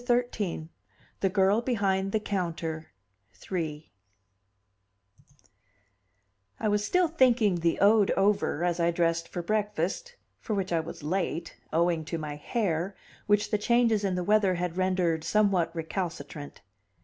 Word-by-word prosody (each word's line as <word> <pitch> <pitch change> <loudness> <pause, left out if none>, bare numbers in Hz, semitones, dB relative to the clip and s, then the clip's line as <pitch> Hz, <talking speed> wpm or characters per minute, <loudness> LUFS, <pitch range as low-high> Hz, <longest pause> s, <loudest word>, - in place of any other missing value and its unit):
XIII: 240 -9 -1 0.5
The 195 - +2
Girl 195 +3 +3
Behind 195 -5 0
the 220 - +1
Counter 170 -5 -3 0.6
III 155 -4 -3 2.7
I - - 0
was 210 0 +1
still 360 +10 +2
thinking 245 - +3
the 170 0 +1
ode 205 +1 +5
over 195 -5 +2
as 175 -1 0
I 170 0 +3
dressed 170 -1 0
for 175 - -5
breakfast, 210 - -2 0.2
for 215 - -3
which 190 -2 -2
I 165 - +3
was 160 -1 -7
late, 170 0 -2 0.2
owing 170 0 +2
to 165 - -3
my 150 -2 -5
hair, 180 +2 -2 0.3
which 210 0 +2
the 210 - +1
changes 230 -1 +3
in 190 -2 0
the 180 - -1
weather 205 -1 +3
had 175 -1 -3
rendered 180 -4 +1
somewhat 195 -3 +2
recalcitrant. 165 -3 -5
190 Hz, 135 wpm, -28 LUFS, 170-210 Hz, 2.7 s, ode